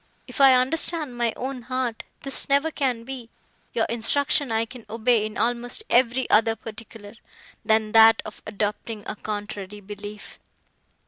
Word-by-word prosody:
If -, -, -4 dB
I 270 Hz, -1 st, +8 dB
understand 295 Hz, +1 st, 0 dB
my 235 Hz, -1 st, +1 dB
own 260 Hz, 0 st, -4 dB
heart, 250 Hz, -1 st, -3 dB, 0.2 s
this 275 Hz, 0 st, -3 dB
never 280 Hz, +3 st, +3 dB
can 255 Hz, -6 st, -1 dB
be; 250 Hz, -2 st, -8 dB, 0.4 s
your 230 Hz, -2 st, +1 dB
instruction 260 Hz, +3 st, +1 dB
I 225 Hz, 0 st, +1 dB
can 240 Hz, 0 st, -11 dB
obey 225 Hz, 0 st, +2 dB
in 215 Hz, -, -9 dB
almost 245 Hz, -, 0 dB
every 250 Hz, +1 st, +3 dB
other 225 Hz, +1 st, +4 dB
particular, 220 Hz, -2 st, -10 dB, 0.5 s
than 220 Hz, -1 st, +2 dB
that 225 Hz, 0 st, +7 dB
of 215 Hz, -, -9 dB
adopting 210 Hz, +1 st, -3 dB
a -, -, -4 dB
contrary 205 Hz, -1 st, -6 dB
belief." 205 Hz, +1 st, -10 dB
230 Hz, 145 wpm, -24 LUFS, 215-255 Hz, 0.5 s, I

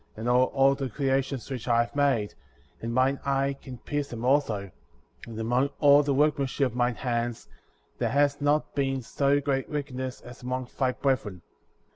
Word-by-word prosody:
41 -, -, -12 dB
and 115 Hz, -, -3 dB
hold 130 Hz, +1 st, +3 dB
all 135 Hz, 0 st, +5 dB
the 135 Hz, -1 st, -3 dB
creations 135 Hz, +1 st, -1 dB
which 125 Hz, -2 st, -5 dB
I 120 Hz, -1 st, +4 dB
have 120 Hz, -, -11 dB
made; 135 Hz, -8 st, +1 dB, 0.5 s
and 115 Hz, -, -3 dB
mine 130 Hz, +3 st, +2 dB
eye 135 Hz, 0 st, 0 dB
can 130 Hz, -2 st, -9 dB
pierce 145 Hz, +3 st, -3 dB
them 120 Hz, 0 st, -5 dB
also, 115 Hz, -8 st, +1 dB, 0.6 s
and 115 Hz, -1 st, -7 dB
among 120 Hz, +5 st, +1 dB
all 145 Hz, 0 st, +6 dB
tlie 140 Hz, -1 st, 0 dB
workmanship 140 Hz, -2 st, +1 dB
of -, -, -12 dB
mine 120 Hz, -1 st, +1 dB
hands*^ 120 Hz, -2 st, -2 dB, 0.5 s
there -, -, +1 dB
has 145 Hz, +1 st, +2 dB
not 145 Hz, +1 st, +1 dB
been 135 Hz, -2 st, -1 dB
so 140 Hz, +4 st, +1 dB
great 135 Hz, -2 st, -1 dB
wickedness 130 Hz, -4 st, -4 dB
as 125 Hz, 0 st, -12 dB
among 125 Hz, 0 st, -3 dB
thy 130 Hz, -2 st, +3 dB
brethren. 115 Hz, -11 st, -1 dB
135 Hz, 180 wpm, -27 LUFS, 120-140 Hz, 0.6 s, all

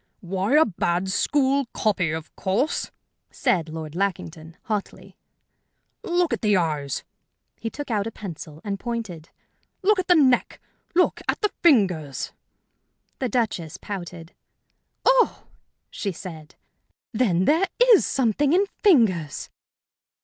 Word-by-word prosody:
"Why, 190 Hz, +7 st, 0 dB
a 315 Hz, -, +6 dB
bad 175 Hz, -1 st, -1 dB
school 275 Hz, +3 st, +2 dB
copy, 190 Hz, -6 st, +1 dB
of 160 Hz, +1 st, -5 dB
course!" 225 Hz, -, -1 dB, 0.4 s
said 165 Hz, -3 st, 0 dB
Lord 155 Hz, -1 st, -6 dB
Lackington, 165 Hz, -3 st, -3 dB
hotly. 210 Hz, -3 st, -5 dB, 0.9 s
"Look 350 Hz, -5 st, +1 dB
at 235 Hz, -, -2 dB
the 210 Hz, -3 st, +3 dB
eyes" 150 Hz, -5 st, -1 dB, 0.6 s
he 225 Hz, -, -3 dB
took 290 Hz, +1 st, -7 dB
out 210 Hz, -1 st, 0 dB
a -, -, -4 dB
pencil 165 Hz, -7 st, -9 dB
and 200 Hz, -2 st, -3 dB
pointed 210 Hz, -10 st, -5 dB, 0.5 s
"look 415 Hz, 0 st, +4 dB
at 370 Hz, -, -2 dB
the 355 Hz, -, +6 dB
neck, 260 Hz, -6 st, +3 dB, 0.4 s
look 360 Hz, -, +2 dB
at -, -, 0 dB
the 420 Hz, -, 0 dB
fingers!" 180 Hz, -, +2 dB, 0.9 s
The 255 Hz, -, -1 dB
Duchess 200 Hz, -9 st, -1 dB
pouted. 175 Hz, -3 st, -7 dB, 0.7 s
"Oh!" -, -, +3 dB, 0.5 s
she 200 Hz, -, -3 dB
said. 165 Hz, -4 st, -10 dB, 0.6 s
"Then 190 Hz, -6 st, +2 dB
there 330 Hz, -, +3 dB, 0.3 s
is 405 Hz, -, +6 dB
something 270 Hz, +4 st, +1 dB
in 385 Hz, +3 st, +4 dB, 0.2 s
fingers!" 205 Hz, -, +2 dB
200 Hz, 125 wpm, -24 LUFS, 170-270 Hz, 0.9 s, a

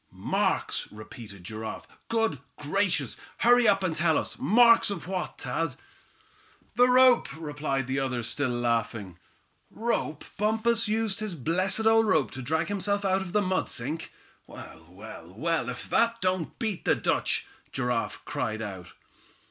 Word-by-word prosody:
"Marks!" -, -, -1 dB
repeated 105 Hz, -2 st, -11 dB
Giraffe. 110 Hz, +4 st, -6 dB, 0.2 s
"Good 225 Hz, -, +1 dB, 0.2 s
gracious! 165 Hz, -, 0 dB, 0.2 s
hurry 245 Hz, 0 st, +5 dB
up 195 Hz, -2 st, +3 dB
and 170 Hz, -4 st, 0 dB
tell 160 Hz, -1 st, +2 dB
us. -, -, -3 dB
Marks 230 Hz, -, +6 dB
of 190 Hz, -5 st, -4 dB
what, 185 Hz, -1 st, -3 dB
Thad?" 165 Hz, -5 st, -2 dB, 1.0 s
"The 245 Hz, +1 st, +5 dB
rope!" 250 Hz, -1 st, +6 dB
replied 150 Hz, -3 st, -2 dB
the 130 Hz, +2 st, -1 dB
other, 125 Hz, -3 st, -2 dB
still 135 Hz, +3 st, 0 dB
laughing. 115 Hz, -6 st, -2 dB, 0.5 s
"Rope! 215 Hz, -10 st, -2 dB, 0.2 s
Bumpus 220 Hz, +2 st, +2 dB
used 220 Hz, -1 st, 0 dB
his 215 Hz, -4 st, -3 dB
blessed 185 Hz, -, +1 dB
old 225 Hz, 0 st, +5 dB
rope 155 Hz, -, +2 dB
to 130 Hz, -, -6 dB
drag 160 Hz, +5 st, 0 dB
himself 200 Hz, +1 st, -1 dB
out 190 Hz, 0 st, +2 dB
of 190 Hz, -2 st, -6 dB
the 210 Hz, +1 st, +2 dB
mud 185 Hz, 0 st, 0 dB
sink! 150 Hz, +7 st, -4 dB, 0.4 s
Well, 80 Hz, 0 st, -12 dB
well, 90 Hz, -3 st, -11 dB
well, 160 Hz, -2 st, 0 dB
if 125 Hz, -, -6 dB
that 230 Hz, 0 st, +2 dB
don't 185 Hz, -4 st, -1 dB
beat 215 Hz, -5 st, -3 dB
the -, -, +3 dB
Dutch," -, -, 0 dB, 0.3 s
Giraffe 125 Hz, -3 st, -2 dB
cried 110 Hz, 0 st, -3 dB
out. 95 Hz, -4 st, -8 dB
165 Hz, 150 wpm, -27 LUFS, -, 1.0 s, Marks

